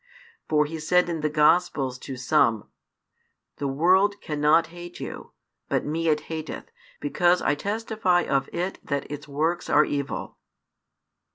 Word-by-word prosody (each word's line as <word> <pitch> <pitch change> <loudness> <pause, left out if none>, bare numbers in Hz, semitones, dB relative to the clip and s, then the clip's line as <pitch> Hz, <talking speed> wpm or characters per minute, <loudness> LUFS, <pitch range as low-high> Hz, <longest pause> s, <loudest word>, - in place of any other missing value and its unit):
For 150 -1 +3
He 160 +2 -6
said 180 +3 +2
in 165 -2 -3
the 150 - +1
Gospels 150 -4 +2
to 130 -1 -7
some: 120 -5 +2 0.9
The 140 - -2
world 185 +9 +3
cannot 150 +2 +2
hate 175 0 -9
you; - - -7 0.4
but - - 0
Me 165 +2 -1
it 150 -1 +2
hateth, 160 -1 -7 0.3
because 175 +4 +2
I - - +1
testify 205 0 0
of 135 0 0
it 180 +2 -3
that 140 0 -3
its 145 +1 -7
works 160 +5 -1
are 150 +1 +5
evil. 140 -9 -4
155 Hz, 145 wpm, -25 LUFS, 145-175 Hz, 0.9 s, are